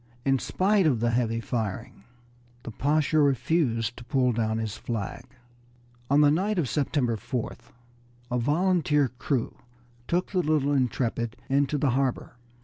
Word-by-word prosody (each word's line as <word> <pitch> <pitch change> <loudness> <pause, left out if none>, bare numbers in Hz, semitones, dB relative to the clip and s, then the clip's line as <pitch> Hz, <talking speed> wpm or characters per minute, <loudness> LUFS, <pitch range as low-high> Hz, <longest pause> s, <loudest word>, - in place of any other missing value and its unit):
In 135 -1 +3
spite 195 +3 +2
of 130 -7 +2
the 120 +1 +1
heavy 115 -1 0
firing 115 -2 -4 0.6
the - - -7
Pasha 150 +5 +1
refused 130 -4 +1
to 125 - -9
pull 125 0 +1
down 110 -1 -1
his 110 -2 -3
flag. 115 +1 -5 0.8
On 140 +2 +5
the 145 -1 +6
night 195 +6 0
of 160 -6 +1
September 130 -4 0
4th 120 0 -5 0.6
a 125 - +1
volunteer 150 0 +2
crew 130 -5 -2 0.5
took 180 +2 0
the 185 - +1
little 150 -3 +1
Intrepid 120 -3 -1
into 140 +2 +2
the 140 -2 +1
harbor. 130 -1 -1
135 Hz, 140 wpm, -26 LUFS, 120-150 Hz, 0.8 s, the